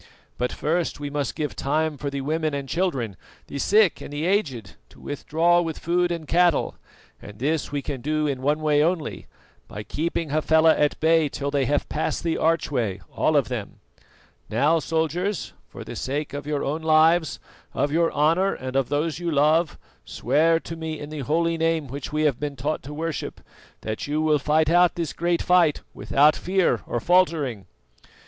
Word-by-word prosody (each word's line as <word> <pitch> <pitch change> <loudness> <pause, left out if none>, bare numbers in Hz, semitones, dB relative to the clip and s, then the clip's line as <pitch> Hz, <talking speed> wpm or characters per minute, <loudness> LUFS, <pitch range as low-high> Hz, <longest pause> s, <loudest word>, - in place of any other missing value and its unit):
But 125 0 0
first 165 +1 -1
we 145 -1 -5
must 145 -3 -2
give 150 -2 -3
time 155 +2 0
for 140 0 -4
the 140 0 -4
women 155 +1 -1
and 140 -1 -4
children, 135 - -1 0.3
the 140 - -6
sick 210 +3 +3
and - - -8
the 145 +2 -3
aged, 140 - -1 0.2
to - - -19
withdraw 165 +4 +1
with 165 -2 -4
food 175 +1 0
and 165 -3 -4
cattle; 175 -1 +2 0.5
and 105 0 -11
this 145 +6 -1
we 145 -1 -3
can 135 -3 -5
do 155 +3 0
in 135 -3 -2
one 150 +3 +1
way 150 -1 +3
only, 165 -2 -2 0.4
by 105 - -7
keeping 165 +3 -3
Hafela 160 +1 +4
at 150 0 +1
bay 160 -1 +3
till 140 +1 -4
they 140 -2 +1
have 145 +3 0
passed 155 - -2
the 165 -1 0
archway, 130 - 0 0.2
all - - +2
of - - +2
them. - - -6 0.7
Now, 145 +9 +2
soldiers, 165 +5 -2 0.2
for - - -9
the - - -8
sake 145 +3 -3
of 145 0 -6
your 150 -2 -1
own 150 +4 -2
lives, 160 0 +3 0.4
of 145 - 0
your 165 +1 +2
honour 165 +7 +2
and 130 0 -6
of 135 -2 +1
those 150 +2 -1
you 175 -1 -2
love, 155 +2 +2 0.3
swear 165 +2 +2
to 165 - -7
me, 160 -1 -5
in 145 +1 -8
the 155 - -5
holy 165 +4 0
Name 165 -1 +1
which 135 +2 -7
we 155 +1 0
have 145 -5 +1
been 145 -1 -4
taught 145 +4 -2
to 140 - -9
worship, 160 0 -4 0.4
that 110 +4 -4
you 150 +1 -1
will 155 -1 +2
fight 155 +2 +2
out 175 0 +4
this 165 -4 -3
great 170 0 0
fight 175 -4 +3
without 150 +2 +3
fear 190 0 +1
or - - -2
faltering." 155 - +1
155 Hz, 185 wpm, -24 LUFS, 145-165 Hz, 0.7 s, Hafela